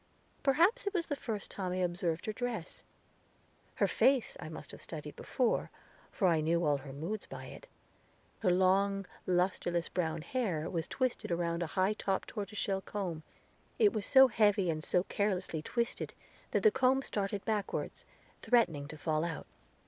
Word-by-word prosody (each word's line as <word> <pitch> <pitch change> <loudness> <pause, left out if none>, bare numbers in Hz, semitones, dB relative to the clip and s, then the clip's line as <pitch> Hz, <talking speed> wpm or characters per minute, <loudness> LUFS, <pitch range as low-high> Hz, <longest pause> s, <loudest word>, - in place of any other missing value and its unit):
Perhaps 345 - +3
it 405 - -1
was 340 -2 +1
the 290 - -2
first 220 -7 -4
time 185 -3 -2
I - - -1
observed 175 -2 -1
her 215 - -2
dress; 230 -6 -4 0.9
her - - +3
face 265 -3 +3
I - - -6
must 155 -2 -7
have - - -11
studied 150 -2 -7
before, 250 -3 0 0.4
for 195 - +2
I 165 -3 +3
knew 170 +2 +2
all 145 -1 +3
her 135 0 -9
moods 165 +10 -4
by - - -8
it. - - -11 0.7
Her 200 - +2
long, 195 +2 +3 0.2
lusterless, 175 -1 +1
brown 165 -3 -1
hair 185 -12 -1
was 165 -3 -2
twisted 255 -2 -1
around 170 0 0
a 170 - -1
high 190 +3 +3
topped 195 -2 -2
tortoise 210 -1 -5
shell 195 -1 0
comb; 185 -6 -4 0.6
it 430 -3 +5
was 205 - -2
so 265 -1 +8
heavy 205 -6 +3
and 155 -1 -4
so 180 +2 +2
carelessly 185 -6 -1
twisted 235 +9 -2 0.3
that - - 0
the 435 - +7
comb 260 -1 +3
started 200 -3 -2
backward, 215 -2 -1 0.5
threatening 165 - +2
to 155 - -8
fall 155 0 0
out. 170 -2 -4
190 Hz, 170 wpm, -33 LUFS, 170-225 Hz, 0.9 s, so